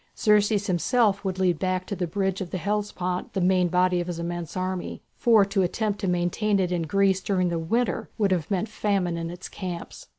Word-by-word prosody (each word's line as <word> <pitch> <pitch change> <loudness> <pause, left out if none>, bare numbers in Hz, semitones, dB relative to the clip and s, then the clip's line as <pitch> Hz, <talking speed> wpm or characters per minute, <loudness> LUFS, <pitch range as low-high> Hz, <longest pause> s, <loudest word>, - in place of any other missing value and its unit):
Xerxes 210 -1 +3
himself 200 +2 +2
would 190 -2 -2
lead 180 -4 +1
back 185 0 -1
to 200 - -4
the 180 -2 -2
bridge 190 +2 -1
of 185 - -4
the 185 - -3
Hellespont 185 -1 -2
the - - -1
main 180 0 +3
body 180 0 +2
of 175 - -5
his 175 -2 -4
immense 170 0 -4
army, 185 -1 -3
for 225 -4 +5
to 195 0 0
attempt 205 +3 -1
to 195 - -2
maintain 180 +4 +1
it 180 -2 0
in 175 -1 0
Greece 195 +1 +2
during 185 -2 +1
the 170 -1 -1
winter 230 +9 -1
would 205 -3 +2
have 175 -5 0
meant 195 +2 0
famine 200 -5 0
in 165 0 -4
its 175 +2 -8
camps. 180 -3 -7
185 Hz, 210 wpm, -25 LUFS, 175-200 Hz, -, for